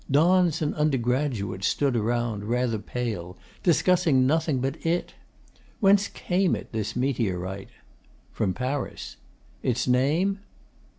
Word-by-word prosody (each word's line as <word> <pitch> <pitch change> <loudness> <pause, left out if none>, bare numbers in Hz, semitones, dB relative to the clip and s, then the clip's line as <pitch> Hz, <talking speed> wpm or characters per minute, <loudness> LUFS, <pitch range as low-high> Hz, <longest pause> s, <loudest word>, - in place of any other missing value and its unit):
Dons 170 +3 +3
and 150 - 0
undergraduates 125 -8 0
stood 140 -3 +1
around, 115 -2 -1
rather 120 -1 0
pale, 105 -7 -4 0.2
discussing 170 -6 +3
nothing 155 0 +1
but 135 +4 -3
it. 170 +2 -1 0.7
Whence 200 -1 +4
came 185 -1 0
it, - - -9
this 110 -2 -3
meteorite? 100 -7 -2 0.6
From 95 - -1
Paris. 130 +2 -4 0.4
Its 125 0 0
name? 155 +11 +2
130 Hz, 110 wpm, -26 LUFS, 115-160 Hz, 0.7 s, Whence